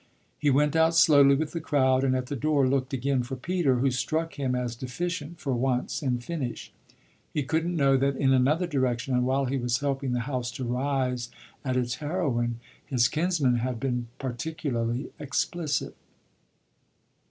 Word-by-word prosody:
He 150 - +2
went 145 +3 +3
out 160 +1 +4
slowly 140 -4 +6
with 155 +2 -2
the 165 - -4
crowd 130 -3 +2
and 130 -1 +2
at 130 -1 -1
the 140 +3 -4
door 140 0 +2
looked 130 0 0
again 135 0 0
for 125 +2 -5
Peter, 155 0 +1
who 130 +2 +2
struck 160 +6 -1
him 130 -3 -1
as 125 -2 -2
deficient 160 +6 -4
for 140 -4 -2
once 125 +4 -1
in 130 -4 0
finish. 130 -1 -5 0.6
He 150 - -1
couldn't 160 +5 -1
know 140 -3 +4
that 140 +1 +1
in 135 0 +3
another 145 +7 +3
direction 130 -5 -1
and 125 0 +2
while 135 +1 +1
he 135 +1 -1
was 120 -1 0
helping 135 -1 -1
the 125 - 0
house 125 -1 -3
to 130 - -5
"rise" 125 -1 -1 0.3
at 130 -2 -1
its 120 -2 -1
heroine, 135 -8 -1 0.2
his 125 -5 +2
kinsman 155 -6 +1
had 120 0 -2
been 125 -2 -2
particularly 125 -2 -3
explicit. 150 +2 -2
135 Hz, 170 wpm, -27 LUFS, 125-150 Hz, 0.6 s, slowly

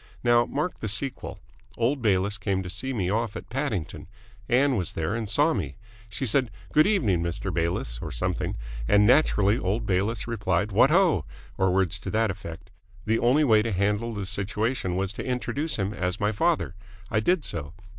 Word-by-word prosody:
Now 120 -1 +4
mark 150 +6 -3
the 110 - -3
sequel. 130 +6 0 0.4
Old 125 +4 +1
Bayliss 100 -1 +1
came 95 -1 -1
to 90 - -6
see 130 +9 -4
me 95 -7 -1
off 110 -1 -1
at - - -8
Paddington. 120 - -3 0.4
Ann 135 +2 +3
was 95 -6 -2
there 80 +4 -2
and 110 -2 -3
saw 150 +8 +4
me. - - -3 0.3
She 135 - -3
said 130 +1 +2 0.2
'Good 155 +3 +5
evening, 115 - +2
Mr. 85 +2 -3
Bayliss' 80 -8 -1
or 75 - -5
something, - - -2 0.3
and 105 +6 +5
naturally 115 -4 +4
old 105 +5 -1
Bayliss 100 +5 0
replied 105 -3 -1
'What 115 +7 +5
ho!' 165 - +3 0.3
or 95 -1 +2
words 95 -3 +1
to - - -6
that 110 -1 +1
effect. 90 -2 -9 0.3
The 110 +1 +1
only 130 +6 +3
way 110 -6 +5
to 115 +1 -2
handle 105 +4 0
the 100 -2 -3
situation 105 0 -2
was 95 +2 -1
to - - -6
introduce 140 +5 -2
him 100 0 -2
as 90 -1 -2
my 105 0 +1
father. 165 - 0 0.4
I 105 - +2
did 170 +8 +1
so. 75 -2 -4
105 Hz, 185 wpm, -26 LUFS, 95-125 Hz, 0.4 s, Good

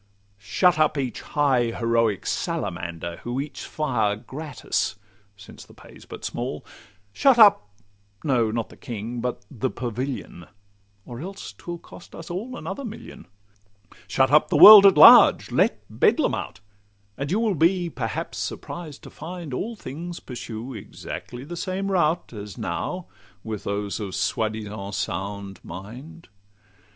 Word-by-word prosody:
Shut 160 - +2
up 155 -1 +2
each 130 -3 -3
high 135 -5 +1
heroic 115 -3 0
salamander, 85 0 -3
Who 120 +2 -4
eats 145 +1 -6
fire 120 -9 -1
gratis 145 +5 -4 0.4
(since 95 - -13
the - - -18
pay - - -15
's - - -15
but - - -9
small); - - -4 0.5
Shut 270 - +4
up—no, 105 - +2
not 115 0 -3
the - - -15
King, 120 +1 -6
but 125 0 -4
the 130 -1 -2
Pavilion, 125 -7 -5 0.6
Or 120 -1 -8
else 195 +4 -8
'twill 175 0 -7
cost 170 - -14
us 165 +1 -9
all 230 +8 -5
another 280 - -6
million. 225 - -9 0.8
Shut 130 +6 +2
up 150 +1 +5
the - - +2
world 210 -2 +12
at 190 -5 +4
large, - - +8
let - - +1
Bedlam - - +2
out; 90 - -5 0.5
And 140 +3 -4
you 195 +6 +1
will 225 -3 +1
be 175 +2 +2
perhaps 115 - -4
surprised 160 -5 -6
to - - -11
find 165 -2 -8
All 225 - -3
things 170 0 -7
pursue 120 0 -7
exactly 120 +3 -8
the 170 +5 -7
same 190 +3 -3
route, 170 -5 +1
As 105 -3 -8
now 175 - -4 0.4
with 110 -2 -6
those 100 +1 -3
of 100 -3 -5
soi 110 +2 0
disant 105 -2 -6
sound 100 +1 -4
mind. 125 - -10
125 Hz, 145 wpm, -24 LUFS, 105-170 Hz, 0.8 s, world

